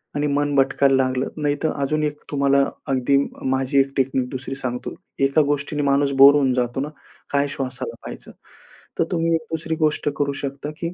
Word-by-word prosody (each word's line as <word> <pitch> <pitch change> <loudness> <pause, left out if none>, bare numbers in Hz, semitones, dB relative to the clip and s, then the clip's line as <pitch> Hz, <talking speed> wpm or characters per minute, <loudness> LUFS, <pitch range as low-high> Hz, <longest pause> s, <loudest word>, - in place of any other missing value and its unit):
आणि 145 0 0
मन 145 0 0
भटकायला 135 0 +3
लागलं 130 0 0
नाही 145 -1 +1
तर, 160 - +2
अजून 155 +2 0
एक 150 -1 -2
तुम्हाला 140 -1 +3 0.3
अगदी 130 +1 +2 0.4
माझी 135 +1 +1
1 135 0 +2
टेक्निक 130 -1 +1
2री 135 +1 -5
सांगतो. 125 -2 -4 0.3
एका 135 +3 +3
गोष्टीने 145 0 -1
माणूस 140 0 +2
बोर 140 +1 +10
होऊन 135 -3 +2
जातो 125 +1 -1
ना, 145 - -3 0.4
काय 140 0 +2
श्वासाला 135 -3 -5
पाहायचं? - - -9 0.7
तर - - +5
तुम्ही 165 -1 +1
एक 160 -1 -3
दुसरी 160 0 -2
गोष्ट 155 -2 +1
करू 140 -1 0
शकता 140 +1 -4
की 170 +1 -3
140 Hz, 180 wpm, -22 LUFS, 135-145 Hz, 0.7 s, बोर